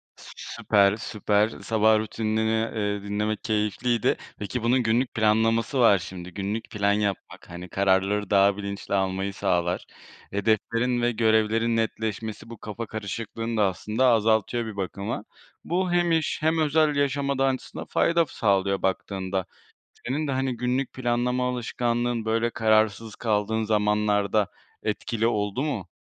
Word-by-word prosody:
Sü - - -13
süper, 100 0 +2
süper, 105 -1 +1
sabah 110 -1 +2
rutinini, 110 +1 0
ııı, 105 -2 -2
dinlemek 105 +1 -2
keyifliydi. 110 +1 0 0.2
Peki, 110 +3 -4
bunun 125 +2 +3
günlük 120 +3 +1
planlaması 115 +3 +2
var 110 -4 +6
şimdi 90 0 -8
günlük 100 +4 -4
plan 100 -1 +1
yapmak, 100 -4 -3
hani, 90 +1 -8
kararları 100 +1 +1
daha 100 0 +4
bilinçli 100 0 -5
almayı 95 0 -1
sağlar. 90 -2 0 0.5
Hedeflerin 115 +4 +1
ve 120 - +2
görevlerin 115 0 +2
netleşmesi 110 0 -3
bu 115 - -9
kafa 105 +3 -6
karışıklığını 115 +2 -4
da 105 - +4
aslında 110 +7 0
azaltıyor 110 0 +2
bir 110 - -6
bakıma. 100 +3 -3 0.4
Bu 180 +1 -1
hem 175 -1 +2
iş 160 -2 +1
hem 160 +1 +2
özel 155 -1 +3
yaşama 140 -1 0
da 135 - +2
aslında 130 -1 -4
fayda 170 0 +2
sağlıyor 100 -4 +1
baktığında. 95 0 -2 0.6
Senin 145 +5 -1
de, - - -1
hani, 130 -2 -1
günlük 125 +3 -1
planlama 125 0 0
alışkanlığın, 120 -1 -1
böyle, 115 +1 +1
kararsız 110 -2 +1
kaldığın 110 0 0
zamanlarda 105 -1 +2 0.4
etkili 110 +1 -1
oldu 105 +2 0
mu? 120 - -3
110 Hz, 135 wpm, -25 LUFS, 100-120 Hz, 0.6 s, var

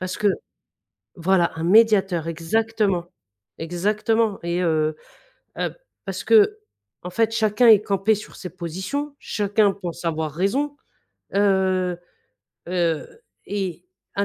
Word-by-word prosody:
Parce 185 0 -4
que 210 - +2 0.9
voilà 175 0 +2
un 160 - -4
médiateur, 195 -4 +4
exactement! 195 +2 0 0.5
Exactement 210 +6 0
et 170 +1 -1
heu 155 -2 +1 0.6
heu, - - -2 0.3
parce - - -4
qu'en 425 - +1
fait 225 +4 +1
chacun 225 +1 +3
est 215 -3 +8
campé 200 +1 +1
sur 210 - -10
ses 180 - -7
positions, 190 - -4
chacun 205 0 +1
pense 175 -3 -7
avoir 160 -2 -1
raison, 230 - -1 0.6
heu 190 -3 +2 0.7
heu, 170 -3 0 0.4
et 190 -4 -4 0.3
un 200 - +3
195 Hz, 115 wpm, -23 LUFS, 175-220 Hz, 0.9 s, est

